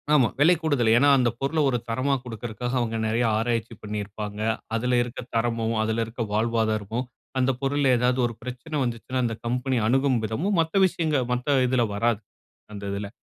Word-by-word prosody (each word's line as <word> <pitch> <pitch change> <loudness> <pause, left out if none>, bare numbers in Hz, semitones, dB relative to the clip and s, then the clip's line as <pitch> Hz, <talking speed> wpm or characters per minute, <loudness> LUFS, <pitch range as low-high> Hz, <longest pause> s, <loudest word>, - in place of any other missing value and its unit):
ஆமா. 135 -6 +5
விலை 160 +5 +6
கூடுதல். 140 -8 +2
ஏனா, 145 +4 +5
அந்த 125 -2 +3
பொருள 140 +4 0
ஒரு 125 - +1
தரமா 130 +5 +1
குடுக்கிறக்காக 120 +1 -4
அவங்க 115 -2 -1
நெறைய 115 +2 +1
ஆராய்ச்சி 115 0 -1
பண்ணியிருப்பாங்க. 105 0 -5 0.4
அதில 125 +2 +1
இருக்க 120 0 -8 0.2
தரமும், 115 0 0
அதில 110 +1 0
இருக்க 115 +1 -4
வாழ்வாதாரமும் 110 +1 0 0.3
அந்த 130 +1 +3
பொருள்ல 140 0 +2
ஏதாவது 125 +1 +1
ஒரு 120 - -7
பிரச்சனை 125 +6 -6
வந்துச்சுனா, 120 +1 -3
அந்த 115 -1 -1
கம்பெனி 125 +2 0
அணுகும் 130 +1 +2
விதமும் 170 - -1
மத்த 165 +4 +2
விஷயங்க 160 -4 0 0.2
மத்த 130 +2 +1
இதில 125 -2 +2
வராது. 115 0 +1 0.5
அந்த 100 -1 -7
இதில. 100 +1 -3
120 Hz, 165 wpm, -25 LUFS, 115-130 Hz, 0.5 s, விலை